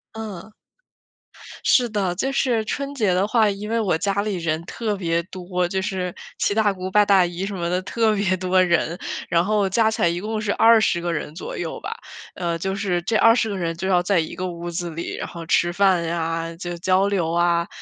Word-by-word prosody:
嗯。 215 -2 -7 1.1
是 245 -3 +4
的， 195 -4 -1
就 265 +9 -1
是 245 -5 +1
春 280 +5 -3
节 210 -8 +2
的 190 +3 +1
话， 220 -2 +3
因 205 +1 -5
为 230 +1 +1
我 195 -7 +1
家 195 +4 -1
里 210 -2 -2
人 165 -2 -1
特 215 +2 -3
别 170 -3 0
多， 180 0 -3
就 190 0 -2
是 185 -2 -3 0.2
七 200 - +1
大 215 -1 +3
姑 185 -1 -5
八 210 +1 +5
大 195 -3 +5
姨 175 +2 -4
什 200 - -5
么 170 -2 -2
的 180 +1 0
特 220 +2 +1
别 195 -2 +1
多 185 0 +2
人， 170 -1 +1 0.3
然 170 0 +3
后 205 0 +1
加 220 +3 +3
起 220 0 -3
来 175 - +4
一 170 +1 -1
共 215 +1 -3
是 210 -2 -1
20 225 -6 +4
个 175 0 -2
人 150 -2 -4
左 - - -6
右 170 -2 -4
吧， 445 +3 -5 0.4
呃， 170 -2 -2
就 190 +3 -2
是 190 -4 -1
这 220 +6 -2
20 230 -1 +4
个 200 - -3
人 165 -2 -2
就 190 +3 -4
要 180 -2 +3
在 180 0 +2
一 160 - -3
个 185 - -3
屋 170 0 -6
子 175 0 -4
里， 165 +2 -5
然 - - -5
后 170 -1 -8
吃 175 +1 +2
饭 190 -2 +3
呀， 165 0 -2
就 175 0 -6
交 185 +3 +2
流 180 -5 0
啊。 170 0 +2
185 Hz, 230 characters per minute, -22 LUFS, 175-210 Hz, 1.1 s, 八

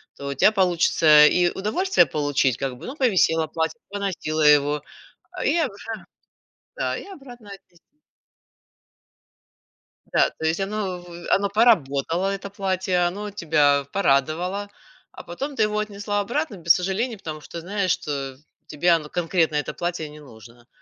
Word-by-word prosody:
то 140 - -8
у - - -2
тебя 175 +10 +4
получится 170 -5 +5
и 175 -1 +3
удовольствие 355 - +2
получить 145 -4 0
как 130 -2 -4
бы, - - -11
ну, 265 - -6
повисело 180 - +2
платье, 165 +8 -3
поносила 190 -6 -3
его, 150 -1 +4 0.5
а, - - -6
и - - +2
обра 260 -12 -1
же 225 +2 -6 0.8
да, - - -1
и - - -7
обратно 245 - -12
отнести. 175 -3 -15 2.3
Да, - - +4
то 160 - -7
есть 160 +4 0
оно 195 -2 -3
в 175 -1 -11
оно 200 0 +2
поработало, 180 - +2
это 195 0 -6
платье, 190 -2 -1
оно 205 +3 -5
тебя 145 -6 +2
порадовало, 180 +4 0 0.4
а - - -11
потом 275 +12 -6
ты 220 - +2
его 210 0 0
отнесла 205 0 -3
обратно 240 +1 -2
без 170 -1 +5
сожаления, 200 +6 -2
потому 155 -5 -7
что 170 - -8
знаешь, 190 0 -1
что 135 -3 -3 0.3
тебе 175 +4 0
оно, 155 -3 +1
конкретно 165 -3 0
это 150 - -2
платье, 175 -3 -3
не 150 0 -13
нужно. 120 -2 -16
180 Hz, 155 wpm, -23 LUFS, 150-205 Hz, 2.3 s, получится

